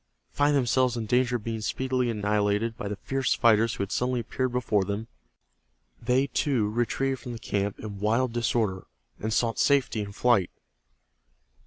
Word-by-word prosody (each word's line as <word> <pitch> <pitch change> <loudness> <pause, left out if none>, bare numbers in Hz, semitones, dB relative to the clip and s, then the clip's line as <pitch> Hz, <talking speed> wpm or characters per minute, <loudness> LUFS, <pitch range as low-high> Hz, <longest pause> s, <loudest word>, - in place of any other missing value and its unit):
Finding 145 0 +2
themselves 125 -1 +2
in 115 - -3
danger 125 +2 +2
of 115 - -3
being 115 -1 -3
speedily 130 +2 -1
annihilated 105 +1 0
by 105 - -5
the 105 - -3
fierce 135 +6 -1
fighters 115 0 +3
who - - -2
had 100 - -6
suddenly 125 0 0
appeared 130 +2 -2
before 115 -5 +1
them, 100 +3 -4 0.9
they, 130 +2 +2
too, 130 -6 0
retreated 130 +3 -1
from 120 - -7
the - - -6
camp 100 -2 -2
in 105 -2 -7
wild 115 +4 +1
disorder, 110 -5 -1 0.3
and 110 - -3
sought 115 -1 0
safety 130 -6 +2
in 100 -1 -6
flight. 105 -3 +2
115 Hz, 165 wpm, -27 LUFS, 105-125 Hz, 0.9 s, fighters